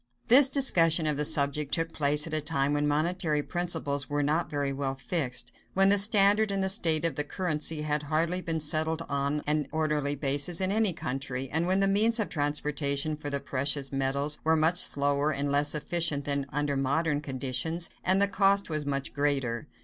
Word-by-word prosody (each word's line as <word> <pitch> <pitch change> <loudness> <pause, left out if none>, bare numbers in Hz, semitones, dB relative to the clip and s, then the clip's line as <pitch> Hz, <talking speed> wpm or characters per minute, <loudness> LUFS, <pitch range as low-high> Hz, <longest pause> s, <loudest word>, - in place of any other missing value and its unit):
This 265 +3 +8
discussion 170 - +4
of 150 -1 0
the 150 +1 -2
subject 145 0 0
took 165 +2 0
place 150 0 0
at 160 - -8
a 155 - +1
time 145 -2 -1
when 145 0 0
monetary 155 0 -1
principles 160 -6 -3
were 145 0 -1
not 155 +3 -1
very 145 -2 -3
well 135 -1 -3
fixed, 130 -2 -3 0.2
when 195 +1 +4
the 205 0 +5
standard 205 +1 +4
and 195 -1 -2
the 190 - 0
state 165 -5 +2
of 165 - 0
the 150 - -2
currency 155 -2 -2
had 150 -1 -2
hardly 165 +5 -1
been 165 -2 -3
settled 160 +2 0
on 140 +1 -2
an 150 -1 -1
orderly 150 -2 -1
basis 145 +4 -1
in 190 0 0
any 215 -1 +1
country, 135 -3 -5
and 160 +3 0
when 190 +1 +1
the 195 - +2
means 220 +4 +1
of 215 - -2
transportation 145 -1 -1
for 150 -1 -6
the 140 0 -2
precious 140 0 -3
metals 140 +2 -1
were 160 0 +2
much 160 +3 +3
slower 145 +1 +4
and 140 0 -2
less 145 +1 +1
efficient 155 -2 -1
than 140 -1 -2
under 145 0 -2
modern 145 +3 -1
conditions, 140 +5 -3
and 190 +1 +3
the 200 - +4
cost 200 -2 +1
was 155 -2 -3
much 140 +1 -3
greater. 140 -2 -2
150 Hz, 195 wpm, -27 LUFS, 140-170 Hz, 0.2 s, This